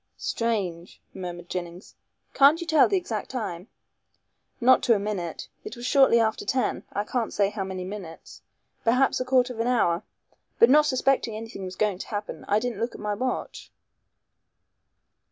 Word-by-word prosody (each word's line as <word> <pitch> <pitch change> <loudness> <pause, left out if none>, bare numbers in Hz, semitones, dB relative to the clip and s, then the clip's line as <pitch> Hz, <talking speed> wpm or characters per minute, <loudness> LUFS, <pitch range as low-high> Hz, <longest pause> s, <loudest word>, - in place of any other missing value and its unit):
"Strange!" 190 -7 -2
murmured 175 -2 -7
Jennings, 175 0 -6 0.4
"can't 285 +4 +6
you 340 - -5
tell 315 -3 +5
the 395 - +1
exact 230 - -4
time?" 210 -7 -5 0.9
"Not 255 +1 +5
to 230 - +4
a - - 0
minute. 195 -5 -4 0.2
It 215 - -7
was 240 - -7
shortly 265 -3 +5
after 220 -1 0
ten. 260 -1 -1
I 205 - -1
can't 230 +1 -2
say 200 -1 +1
how 205 -2 -3
many 190 -1 -5
minutes. 185 -4 -9 0.4
Perhaps 255 +4 +3
a 255 - -2
quarter 255 -1 +2
of 225 - -11
an 230 - 0
hour. 180 -9 +2 0.6
But 235 - +6
not 300 +1 +6
suspecting 260 -4 +1
anything 225 -3 -7
was 185 0 -7
going 205 -3 0
to - - -7
happen, 205 0 -5
I 205 - +3
didn't 230 -2 -2
look 230 +1 -2
at - - -10
my 210 0 -2
watch." 255 +5 -4
220 Hz, 170 wpm, -26 LUFS, 190-255 Hz, 0.9 s, can't